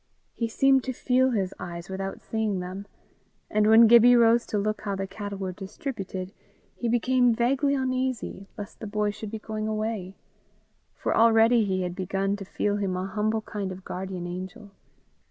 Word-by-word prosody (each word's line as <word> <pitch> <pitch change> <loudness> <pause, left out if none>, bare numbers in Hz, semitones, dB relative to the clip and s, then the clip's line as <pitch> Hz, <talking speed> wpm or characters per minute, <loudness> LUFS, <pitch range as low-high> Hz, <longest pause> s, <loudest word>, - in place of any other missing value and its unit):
He 230 - -2
seemed 270 +3 +3
to 260 - -2
feel 255 +1 +2
his 195 -6 -1
eyes 170 0 -7
without 195 0 -5
seeing 220 -4 -2
them; 185 +3 -6 0.6
and 210 0 +3
when 225 +1 +8
Gibbie 235 +2 +7
rose 235 0 +4
to 210 - -1
look 215 +1 -1
how 200 -2 -2
the 195 0 -3
cattle 200 +1 -6
were 190 -1 -3
distributed, 195 -1 -6 0.4
he 240 - -2
became 245 0 +3
vaguely 275 +4 +2
uneasy 255 -6 -2
lest 205 -2 -8
the 220 - -6
boy 210 0 0
should 215 0 -7
be 220 - -5
going 215 0 -4
away. 215 -3 -3 0.8
For - - -1
already 225 0 +5
he 185 -1 -1
had 180 -1 -3
begun 195 +1 -1
to 200 - -8
feel 205 +2 -1
him 190 -3 -1
a 185 - -2
humble 215 +3 -1
kind 205 -3 -5
of 185 0 -9
guardian 185 -1 -5
angel. 185 +3 -7
210 Hz, 175 wpm, -26 LUFS, 195-230 Hz, 0.8 s, when